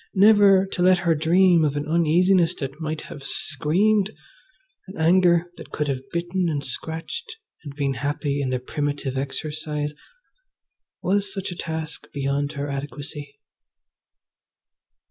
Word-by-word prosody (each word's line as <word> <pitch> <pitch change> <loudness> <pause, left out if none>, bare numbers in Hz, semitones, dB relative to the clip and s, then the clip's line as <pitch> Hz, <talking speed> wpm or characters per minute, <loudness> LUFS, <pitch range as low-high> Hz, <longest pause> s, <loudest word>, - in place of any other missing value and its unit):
Never 200 -1 +6
to 180 - -3
let 185 +1 +6
her 170 - +4
dream 170 +2 +4
of 145 -1 0
an 145 - -3
uneasiness 170 +2 +3
that 140 +2 -6
might 155 0 -3
have 145 - -10
screamed, 185 +10 +1 0.8
an 190 - -10
anger 175 +1 +4
that - - -10
could 150 - -2
have 135 -1 -3
bitten 175 +1 -1
and 145 -3 -2
scratched 165 - -6 0.3
and 145 -2 -8
been 140 -2 0
happy 145 0 -2
in 135 - -1
the 130 - 0
primitive 145 +1 -3
exercise. 150 +2 -3 1.1
Was 195 +2 +1
such 195 -1 -4
a - - -6
task 160 -1 -5
beyond 140 +1 -1
her 140 0 -3
adequacy? 140 +1 -6
155 Hz, 135 wpm, -24 LUFS, 145-180 Hz, 1.1 s, Never